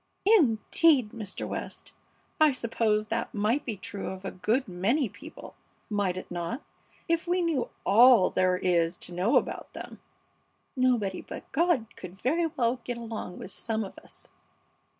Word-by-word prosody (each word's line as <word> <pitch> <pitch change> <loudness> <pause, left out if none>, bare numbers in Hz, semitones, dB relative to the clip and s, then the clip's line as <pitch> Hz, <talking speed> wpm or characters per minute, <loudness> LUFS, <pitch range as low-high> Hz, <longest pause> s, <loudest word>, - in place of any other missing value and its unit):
"Indeed! 290 - +4
Mr. 215 -4 -5
West, - - -6 0.5
I 310 -2 +6
suppose 220 -3 0
that 230 0 -2
might 220 +8 +1
be 225 -5 -4
true 205 0 -6
of 190 0 -6
a - - -3
good 230 +8 0
many 220 - +1
people, - - -12 0.4
might 200 -3 0
it 185 - -8
not, 175 - -4 0.4
if 335 +1 0
we 355 +1 +1
knew 315 -7 0 0.2
all 225 0 +7
there 185 0 +2
is 175 -1 +1
to 175 - -6
know 185 +6 +1
about - - 0
them? - - -9 0.8
Nobody 245 -7 +1
but - - -10
God 330 -6 +2
could 180 0 -9
very 320 - +1
well 245 -4 0
get 245 -1 -4
along 225 -6 -6
with 190 - -7
some 220 +1 -1
of 195 - -9
us." - - -13
225 Hz, 155 wpm, -28 LUFS, 190-260 Hz, 0.8 s, all